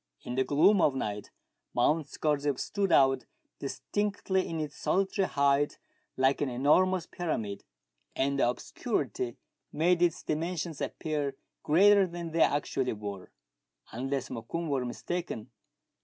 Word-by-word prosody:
In 120 - -5
the 130 +1 +2
gloom 175 +9 +4
of 145 -4 +3
night 105 -5 -3 0.5
Mount 150 +5 +2
Scorzef 145 -2 0
stood 200 -2 -1
out 135 -2 +4 0.3
distinctly 195 +5 -1
in 165 - -3
its 150 -2 -4
solitary 195 0 +1
height, 140 +1 +2 0.4
like 135 +1 +2
an 145 - +1
enormous 165 +9 +3
pyramid, 110 - -3 0.5
and 140 +1 0
the 120 - +4
obscurity 125 - -3 0.3
made 170 +3 +2
its 175 -2 +2
dimensions 165 0 -3
appear 145 -3 -2 0.3
greater 195 +5 +5
than 170 -1 -6
they 165 0 +1
actually 140 -3 +1
were. 100 -3 -7 0.6
Unless 135 +3 -3
Mokoum 155 +9 -4
were 135 -3 0
mistaken. 125 -2 -4
145 Hz, 125 wpm, -30 LUFS, 130-175 Hz, 0.6 s, greater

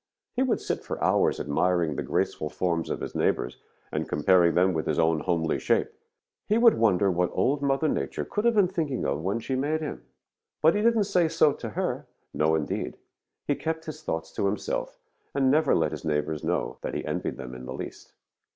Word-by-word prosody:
He 255 - +1
would 260 -3 +2
sit - - -3
for - - -5
hours - - +3
admiring 85 +1 +1
the - - -2
graceful 75 - -1
forms 85 -1 -1
of - - -3
his - - -5
neighbors - - 0 0.3
and - - -2
comparing 85 +3 +4
them 95 +1 +4
with 80 -2 -2
his 75 - 0
own 80 -1 +3
homely 80 0 0
shape. - - +1 0.6
He 215 - +3
would 230 -1 +7
wonder 100 -3 +3
what 90 0 +1
Old 140 +2 +1
Mother 140 +2 +1
Nature - - -2
could 210 - -2
have 235 -1 +4
been 200 -3 +5
thinking 160 -8 -2
of 70 +3 -1
when 100 +6 -1
she 130 - -4
made 150 +4 0
him. 70 - -5 0.6
"But 160 +2 +5
he 205 - 0
didn't 230 -1 +4
say 180 -4 +2
so 160 -2 +3
to 115 - -6
her. 105 - -3 0.3
No, 80 +2 +2
indeed! 75 -2 -3 0.5
He 145 - +2
kept 160 +2 -3
his 155 0 -7
thoughts 80 - -3
to 100 - 0
himself 100 +1 -3 0.4
and 135 -2 +3
never 155 0 +4
let 80 -2 +1
his 80 - -6
neighbors 75 0 -1
know - - -1
that - - -4
he - - -3
envied - - -3
them 65 -1 -7
in 65 0 -8
the 65 - -5
least. - - -8
95 Hz, 205 wpm, -27 LUFS, -, 0.6 s, would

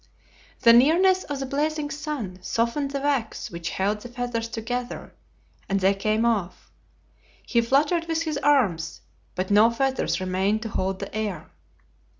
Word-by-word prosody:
The 230 -2 +7
nearness 350 +10 +5
of 285 -2 -4
the 270 - -2
blazing 295 +2 -1
sun 285 - -5
softened 235 +8 -1
the 275 0 -3
wax 275 -6 -1
which 170 -1 -5
held 205 +2 -1
the 245 - -9
feathers 240 -1 -3
together, 240 +2 -5 0.6
and 195 0 +1
they 195 +1 +3
came 215 +3 0
off. 200 -6 -1 0.7
He 235 - +2
fluttered 295 +8 +2
with 325 0 0
his 310 -3 -2
arms, 250 - +1 0.3
but 185 +2 -2
no 210 +3 +6
feathers 265 0 0
remained 190 +4 0
to 225 - -4
hold 190 -1 -2
the - - -7
air. 215 -4 -4
235 Hz, 150 wpm, -25 LUFS, 205-285 Hz, 0.7 s, The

